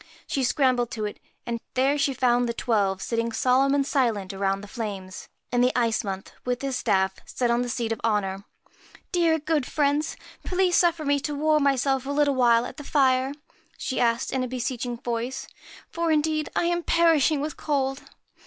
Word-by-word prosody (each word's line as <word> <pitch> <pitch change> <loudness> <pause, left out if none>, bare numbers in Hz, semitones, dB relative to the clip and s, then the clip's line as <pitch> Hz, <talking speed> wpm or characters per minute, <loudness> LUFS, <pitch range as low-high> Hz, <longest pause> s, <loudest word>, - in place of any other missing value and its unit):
She 270 - -1
scrambled 250 -2 +2
to 215 -4 -3
it, 210 - -6 0.3
and 235 -1 -3 0.2
there 270 +3 +3
she 280 -1 +1
found 245 -1 +2
the 235 - -3
Twelve 200 -6 0
sitting 230 0 -1
solemn 260 +4 +3
and 280 -1 +2
silent 225 -9 0
around 195 0 -1
the 205 - -10
flames, 200 -4 -6 0.2
and 245 0 +3
the 250 - +4
Ice 230 -2 +1
Month, 195 -2 -5
with 250 +1 -2
his 270 -1 -1
staff, 190 -5 +1
sat - - -23
still 245 -2 0
on 235 +1 +2
the 245 - -2
seat 230 -1 -2
of 225 - -3
honour. 200 -3 0 0.4
* - - -24
Dear, 335 -2 +3
good 305 -3 -1
friends, 295 +1 0 0.3
please 365 -1 +1
suffer 335 -3 +2
me 285 0 +2
to 295 +1 -3
warm 305 +1 +2
myself 270 -1 +1
a - - -4
little 285 0 +2
while 240 -2 +4
at - - -8
the 295 - -7
fire,' 265 -2 +2 0.4
she 260 - -3
asked 235 0 +1
in 260 -1 0
a - - -2
beseeching 245 -1 -3
voice; 240 +2 -4 0.4
'for, 335 -1 -1
indeed, 310 0 +1
I - - +2
am 345 0 +1
perishing 325 -3 +3
with 300 +2 -3
cold.' 270 -2 -1
255 Hz, 195 wpm, -25 LUFS, 230-290 Hz, 0.4 s, the